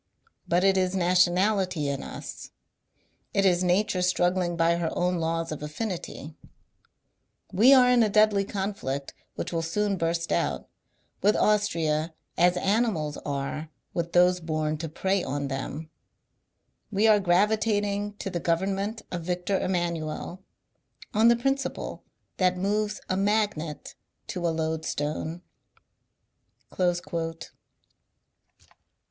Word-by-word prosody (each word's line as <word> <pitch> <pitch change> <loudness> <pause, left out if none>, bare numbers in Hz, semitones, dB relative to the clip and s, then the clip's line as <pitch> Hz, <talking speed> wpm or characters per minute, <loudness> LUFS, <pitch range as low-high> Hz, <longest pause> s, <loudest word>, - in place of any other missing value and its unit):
But 175 +2 +2
it 195 0 +4
is 185 0 +1
nationality 185 -1 +2
in 140 -1 -2
us, - - -8 0.9
it 195 - +3
is 180 -1 +3
nature 185 +1 +1
struggling 180 -1 +1
by 170 0 +3
her 170 -1 -1
own 180 0 +1
laws 165 0 -1
of 155 - -5
affinity; 160 -1 -5 1.2
we 230 +8 +6
are 255 -2 +7
in 250 -1 +5
a 220 - +3
deadly 210 -1 +4
conflict 190 -9 -4 0.2
(which - - -4
will 165 - 0
soon 200 +4 -1
burst 165 0 -1
out) - - -1 0.5
with 210 +1 +4
Austria 165 -7 +1 0.2
as 180 +1 +3
animals 195 -7 0
are 145 +2 -3 0.2
with 170 0 -3
those 180 +1 +5
bom 155 -2 -1
to 165 +1 -5
prey 190 +4 0
on 140 +1 -2
theoL 145 +3 -5 1.0
We 210 +2 +3
are 215 -1 +6
gravitating 205 +2 +1
to 195 - -5
the 175 - -2
government 195 +6 -1
of 175 -1 -3
Victor 180 +3 -1
Emmanuel, 175 0 -3 0.7
on 220 +1 +5
the 235 - +6
principle 270 +3 -2 0.3
that 185 -1 +2
moves 210 +2 -1
a 185 - 0
magnet 200 -6 -1 0.4
to 175 -2 -2
a - - +2
loadstone." 160 +1 -3
180 Hz, 120 wpm, -27 LUFS, 165-205 Hz, 1.2 s, are